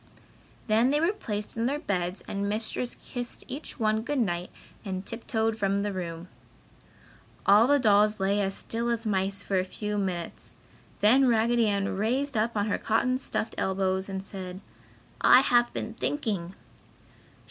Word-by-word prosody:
Then 225 +3 +3
they 295 +2 +2
were 335 +6 +2
placed 210 - -4
in 230 +1 0
their 280 +3 0
beds 185 - -2
and 200 0 -2
Mistress 225 +3 -1
kissed 245 -1 -6
each 275 +1 -6
one 215 -1 +2
good 290 +5 -2
night 180 -7 -1 0.3
and 190 -2 -4
tiptoed 225 -1 -2
from 200 0 +1
the 205 -1 -2
room. 170 -2 -5 1.2
All 210 +4 +6
the 285 +1 +5
dolls 210 -3 +4
lay 200 +2 +1
as 195 -1 -1
still 235 +1 -3
as 235 -1 -1
mice 195 -1 0
for 195 -2 0
a - - +1
few 210 +2 -3
minutes, 180 -4 -4 0.5
then 255 +6 +5
Raggedy 235 0 +3
Ann 200 -2 0
raised 260 +6 0
up 220 +1 0
on 205 - +1
her 210 - -1
cotton 250 +3 +1
stuffed 230 -4 -3
elbows 190 0 0
and 190 0 -4
said: 185 -2 -7 0.6
"I 255 - +8
have 240 -2 +3
been - - -4
thinking!" 200 - -2
210 Hz, 160 wpm, -28 LUFS, 195-235 Hz, 1.2 s, I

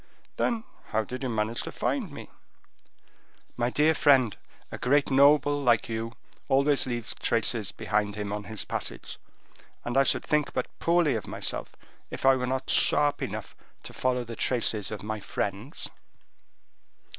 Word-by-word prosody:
"Then 230 -2 0 0.2
how 110 0 0
did 125 +4 -7
you 130 - -2
manage 110 0 -1
to - - -6
find - - -1
me?" - - -10 1.2
"My 120 0 0
dear 150 +5 +3
friend, 135 -6 +4 0.4
a - - -6
great 140 +3 +2
noble 145 +1 +5
like 120 -4 +3
you 115 0 -3 0.3
always 140 +1 +3
leaves 120 -2 -3
traced 115 -2 0
behind 105 -1 0
him 105 -1 -3
on 105 0 -4
his 110 +2 -3
passage; - - -4 0.7
and 120 - -3
I 135 - +6
should 135 - +3
think 150 -1 +1
but 125 - 0
poorly 170 -4 +3
of 110 -4 -3
myself, - - -3 0.3
if - - -5
I 135 0 +7
were 125 -1 -2
not 130 +1 -2
sharp 145 -1 +3
enough - - -5 0.3
to - - -9
follow 125 -1 0
the 115 -1 -7
traces 110 -4 0
of 105 -2 -6
my 110 0 -3
friends." 100 - -4
125 Hz, 155 wpm, -28 LUFS, 110-140 Hz, 1.2 s, I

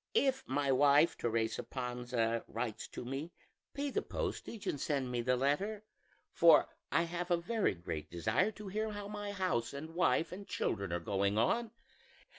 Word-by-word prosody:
If 265 - +3
my 140 +1 +1
wife 145 +4 +5
Teresa 115 -1 0
Panza 125 -2 -2
writes 115 -1 -4
to - - -7
me, 135 +6 -4 0.4
pay 285 0 -1
the - - 0
postage 225 -4 -4
and 145 - -2
send 135 -4 0
me 120 -1 0
the 125 +2 +2
letter, 170 +12 0 0.5
for - - +7 0.2
I 165 - +3
have 175 +1 -3
a 175 - +4
very 200 - 0
great 85 -3 -5
desire 110 - +1
to 210 -2 -8
hear 215 +2 -2
how 205 -1 -5
my 205 0 -5
house 180 -12 -1
and 160 +3 -7
wife 170 -1 +2
and 195 +2 -8
children 100 -4 -1
are 85 - 0
going 100 +3 0
on. 230 - +2
145 Hz, 170 wpm, -34 LUFS, 120-200 Hz, 0.5 s, for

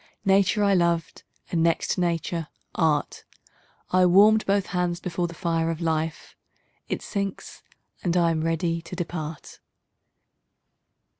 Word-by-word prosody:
Nature 195 +1 +3
I 200 -1 +4
loved 170 -2 0 0.3
and, 170 - +1
next 165 0 +1
to 180 - 0
Nature, 170 -1 -1 0.3
Art: 155 -4 0 0.7
I 185 0 +5
warm'd 210 +4 +5
both 200 -1 +2
hands 175 -1 0
before 175 0 -2
the 170 - -10
fire 165 -2 0
of 165 -1 -3
life; 160 -1 -2 0.5
It - - -3
sinks, 200 -2 -5 0.4
and 175 -1 +1
I 170 -1 +3
am 160 -1 -1
ready 165 +1 0
to 170 +2 -9
depart. 160 -3 -6
170 Hz, 135 wpm, -25 LUFS, 165-185 Hz, 0.7 s, I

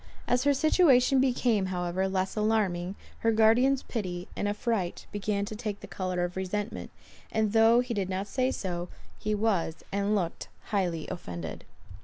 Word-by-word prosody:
As 250 +2 +2
her 285 - +5
situation 270 -4 +4
became, 240 -6 +2
however, 180 +1 -1
less 190 0 -1
alarming, 200 -4 0 0.2
her 225 - +2
guardian's 235 +5 +4
pity 180 -6 -4
and 205 - -1
affright 205 -3 -1
began 205 0 -1
to 215 - -6
take 210 -2 -4
the - - -7
colour 185 -2 -2
of 175 0 -3
resentment; 200 +3 -3 0.4
and 220 -1 +1
though 225 +2 +6
he 250 -1 -3
did 195 -4 -1
not 190 +1 -2
say 255 +5 0
so, 175 -7 -3 0.3
he 215 0 -1
was, 200 -7 0
and 200 +1 +1
looked, 175 -5 -2 0.2
highly 175 -6 0
offended. 85 - -6
205 Hz, 160 wpm, -29 LUFS, 185-225 Hz, 0.4 s, though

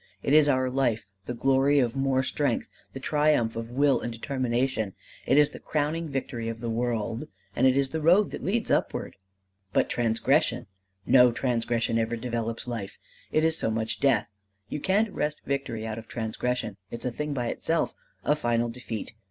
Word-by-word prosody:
It 140 - +1
is 150 -1 +6
our 130 -2 +2
life, 125 -4 0 0.2
the 120 - -4
glory 135 +3 +3
of 125 -3 +2
more 135 -1 +2
strength, 135 -2 0 0.2
the 135 - -7
triumph 145 -5 +2
of 115 0 -4
will 140 +2 +3
and 120 - -3
determination. 120 -3 -1 0.3
It - - +4
is 150 -1 +6
the - - -10
crowning 155 +2 -1
victory 125 -4 -3
of 115 0 -5
the 115 -1 -3
world. 115 -1 -2 0.3
And 130 - +4
it 130 +1 +3
is 135 -1 +1
the 160 - -2
road 180 +6 +5
that - - -6
leads 225 +3 0
upward. - - 0 0.6
"But - - +2
transgression! 115 -1 +1 0.4
No 125 -2 +6
transgression 115 -2 0
ever 115 +1 0
develops 115 -1 -3
life; 115 -5 -5 0.3
it 155 +1 +3
is 160 0 +2
so - - 0
much 110 0 -2
death. 135 -6 +2 0.4
You 150 - -3
can't 200 +6 +1
wrest 150 0 -2
victory 135 -5 -2
out 110 0 -4
of 110 - -12
transgression: 115 -1 -2
it's 120 - -7
a 125 - 0
thing 150 +3 -3
by 120 -2 -1
itself 165 0 0 0.3
a 150 - +4
final 120 -4 0
defeat. 115 -2 -6
125 Hz, 180 wpm, -27 LUFS, 115-145 Hz, 0.6 s, is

